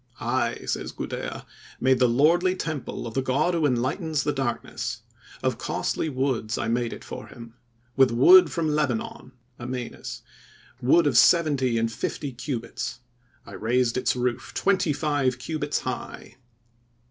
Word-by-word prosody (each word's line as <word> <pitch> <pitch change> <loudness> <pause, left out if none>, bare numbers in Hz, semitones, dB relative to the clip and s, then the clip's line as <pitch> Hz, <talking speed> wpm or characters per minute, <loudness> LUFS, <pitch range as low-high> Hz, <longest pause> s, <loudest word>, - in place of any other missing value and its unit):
"I," 120 0 -1
says - - -3
Gudea, - - -5 0.3
"made 130 +1 +3
the 125 -2 +4
lordly 170 +9 +3
temple 155 -9 -4
of 115 - -6
the 135 - 0
God 135 +7 +1
who 165 -3 +2
enlightens 145 +5 -1
the 150 - 0
darkness; 135 -4 -3 0.4
of - - 0
costly 160 - -2
woods 130 -5 -1
I - - -2
made 120 0 0
it - - -8
for - - -8
him; 115 -1 -12 0.4
with 135 -1 +5
wood 360 - +7
from 165 -2 -1
Lebanon 130 -3 -2 0.3
(Amanus); 125 0 -6 0.6
wood 145 +7 +4
of 130 -5 +5
seventy 140 -6 +4
and 115 0 0
fifty 140 +4 -4
cubits. 125 0 -5 0.4
I - - -12
raised 115 +4 +1
its 130 0 +1
roof 125 -1 -2
twenty 190 -5 +2
five 145 -3 0
cubits 145 +2 -2
high." 130 0 -6
130 Hz, 145 wpm, -25 LUFS, 120-150 Hz, 0.6 s, wood